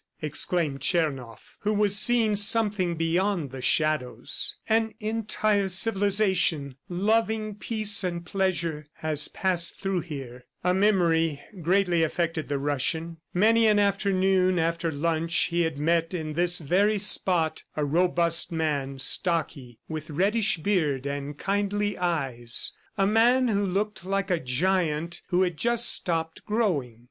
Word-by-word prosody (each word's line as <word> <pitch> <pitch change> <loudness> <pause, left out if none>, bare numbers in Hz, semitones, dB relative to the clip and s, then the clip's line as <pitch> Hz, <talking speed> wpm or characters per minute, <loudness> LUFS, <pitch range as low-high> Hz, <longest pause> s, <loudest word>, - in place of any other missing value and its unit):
exclaimed 155 -1 -1
Tchernoff 135 - -2
who 210 +1 -1
was 205 -1 +1
seeing 225 0 +3
something 205 -4 +2
beyond 165 -1 -1
the 130 -1 -8
shadows. 130 -3 0
"An 220 -1 +1
entire 215 -2 0
civilization, 190 - +1 0.2
loving 215 +3 0
peace 210 -1 +1
and 175 -1 -4
pleasure, 170 -6 -2
has 150 -2 +1
passed 180 -3 -1
through 195 -2 -1
here." 135 -7 -8 0.2
A 180 0 +2
memory 170 -6 +2 0.2
greatly 180 0 +2
affected 165 0 -1
the 145 - -2
Russian. 155 +4 -2
Many 225 +4 +3
an 210 -1 +3
afternoon, 190 -2 +1
after 165 0 -1
lunch, 165 +2 -2 0.2
he 170 0 +1
had 160 -3 -1
met 165 +3 0
in 155 -3 -4
this 175 +2 +2
very 195 +7 +1
spot 180 -5 +2
a 150 - 0
robust 170 +2 +2
man, 145 -4 -2
stocky, 140 - 0
with 155 0 -6
reddish 200 +7 +1
beard 155 -7 -1
and 140 +1 -5
kindly 205 +1 -1
eyes 135 -9 0 0.2
a 195 - +2
man 240 +4 +3
who 205 -2 0
looked 200 0 -2
like 195 +1 -2
a 175 - +1
giant 165 +4 -1
who 180 0 +2
had 175 -3 -2
just 235 +3 +1
stopped 165 -2 -2
growing. 170 - -1
175 Hz, 135 wpm, -26 LUFS, 155-200 Hz, 0.2 s, seeing